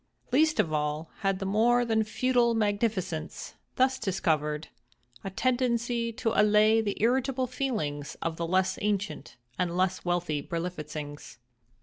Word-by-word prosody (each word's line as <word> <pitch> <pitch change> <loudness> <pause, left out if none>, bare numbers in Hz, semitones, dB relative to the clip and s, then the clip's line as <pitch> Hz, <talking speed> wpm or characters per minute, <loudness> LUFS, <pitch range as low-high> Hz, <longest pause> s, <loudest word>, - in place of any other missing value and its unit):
Least 310 +4 +3
of 155 - +2
all 150 +1 -2
had 195 -2 +1
the 195 - -4
more 235 +5 +3
than 220 -1 +2
feudal 240 +1 +2
magnificence, 205 -6 -1 0.2
thus 260 0 +2
discovered, 155 -6 -1 0.5
a - - -3
tendency 240 +1 0
to 225 -1 -1
allay 215 +1 +5
the 205 -2 -2
irritable 255 +3 +1
feelings 215 - -3
of 165 -1 -2
the 170 0 -3
less 185 +2 +1
ancient 205 -1 -2 0.2
and 175 -1 0
less 185 0 +1
wealthy 175 -4 -1
Berlifitzings. 150 -3 -6
205 Hz, 130 wpm, -28 LUFS, 170-235 Hz, 0.5 s, allay